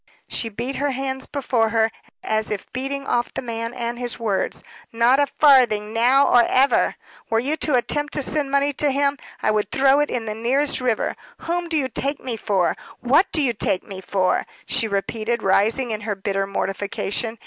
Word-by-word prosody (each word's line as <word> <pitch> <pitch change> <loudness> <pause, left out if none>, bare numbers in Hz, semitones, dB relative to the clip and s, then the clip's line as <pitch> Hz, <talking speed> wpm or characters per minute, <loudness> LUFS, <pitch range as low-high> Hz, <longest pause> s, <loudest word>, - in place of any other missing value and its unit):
She 230 - -3
beat 240 +6 -4
her 285 0 0
hands 265 0 -3
before 250 -5 0
her, 225 0 +2 0.3
as 220 0 -1
if 210 -3 -5
beating 275 +2 -3
off 240 -2 0
the - - -5
man 230 -1 -4
and 240 -1 -4
his 245 -1 -2
words. 215 -5 -2 0.3
"Not 235 +4 +3
a 285 - +3
farthing, 240 -9 +4
now 250 +5 +4
or 245 - +6
ever. 265 +4 +3 0.3
Were 225 - +2
you 270 +7 +1
to 300 -4 +1
attempt 295 +4 0
to 290 - 0
send 290 0 0
money 280 +1 +1
to 290 +2 +1
him, 280 0 +1 0.2
I 215 - +3
would 210 -1 0
throw 270 +3 +4
it 295 - +1
into 235 -2 -2
the 220 - -10
nearest 265 +4 +1
river. 245 -4 0 0.3
Whom 345 0 -2
do 320 - +1
you 270 -3 +1
take 275 +3 -2
me 250 -3 -4
for? 200 -5 0 0.3
What 280 +10 +3
do 310 - +2
you 245 -3 +2
take 190 -3 0
me 190 -2 -9
for?" 185 -1 0 0.2
she 225 - 0
repeated, 220 +3 -2
rising 225 +6 +2
in 215 -1 -3
her 210 -1 -3
bitter 195 0 -2
mortification. 200 +3 -2
240 Hz, 195 wpm, -22 LUFS, 215-275 Hz, 0.3 s, or